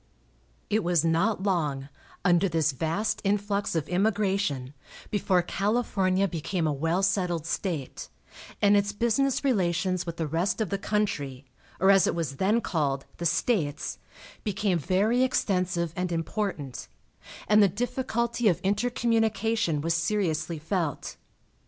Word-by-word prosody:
It 215 0 +2
was 170 -2 +2
not 185 +5 +1
long, 150 -9 0 0.4
under 180 +1 +4
this 160 -2 +1
vast 165 - -1
influx 205 -1 0
of 160 -2 -1
immigration, 190 -8 0 0.4
before 190 -3 +2
California 195 -1 +1
became 165 +1 -2
a 155 - +1
well 165 +6 0
settled 180 -4 0
state, 165 -4 -3 0.5
and 205 0 +6
its 205 0 +1
business 235 +6 +1
relations 185 - 0
with 170 -1 -5
the 165 - -1
rest 165 +8 -1
of 215 -5 -1
the 200 - -1
country, 145 -12 -2 0.3
or 190 +2 +5
as 195 -1 +5
it - - 0
was 150 -5 -3
then 210 +7 +2
called, 140 -8 -1
"The 170 - 0
States," 165 - -1 0.4
became 200 -4 0
very 200 - +2
extensive 180 -9 0
and 180 0 -2
important, 165 - -3 0.6
and 210 0 +6
the 200 - +7
difficulty 235 +2 -1
of 180 - +3
intercommunication 220 -4 +1
was 165 +2 0
seriously 165 -2 -1
felt. 160 -2 -3
185 Hz, 135 wpm, -27 LUFS, 165-210 Hz, 0.6 s, the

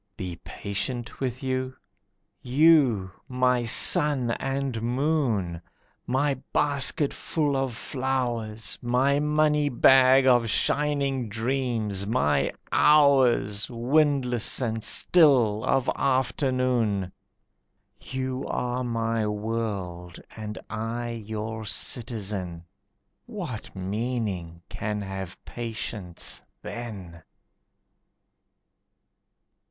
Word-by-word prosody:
Be 90 -2 -5
patient 120 +4 -5
with 130 0 -3
you? 130 0 -2 0.7
You! 130 - +3 0.2
My 125 -1 +1
sun 140 0 +5
and 135 -2 -2
moon! 120 - 0 0.5
My 135 +1 0
basketful 145 +1 +1
of 135 -3 -1
flowers! 120 -5 -3
My 130 +4 +2
money 150 0 +2
bag 130 +1 +5
of 120 -3 +4
shining 140 -2 0
dreams! 110 -4 -2
My 115 -9 +1 0.2
hours, 130 -9 +4
Windless 125 -1 +2
and 115 -3 -2
still, 125 -11 +4
of 135 -1 +1
afternoon! 125 -7 0 0.9
You 130 0 -4
are 125 +1 -2
my 115 -2 -1
world 105 -5 -4 0.2
and 105 -1 -6
I 115 +2 -4
your 110 0 -5
citizen. 100 -7 -4 0.6
What 175 - -7
meaning 95 -4 -3
can 105 -1 -4
have 95 -2 -6
patience 110 -6 -4 0.2
then? 95 -8 -8
120 Hz, 80 wpm, -26 LUFS, 105-135 Hz, 0.9 s, sun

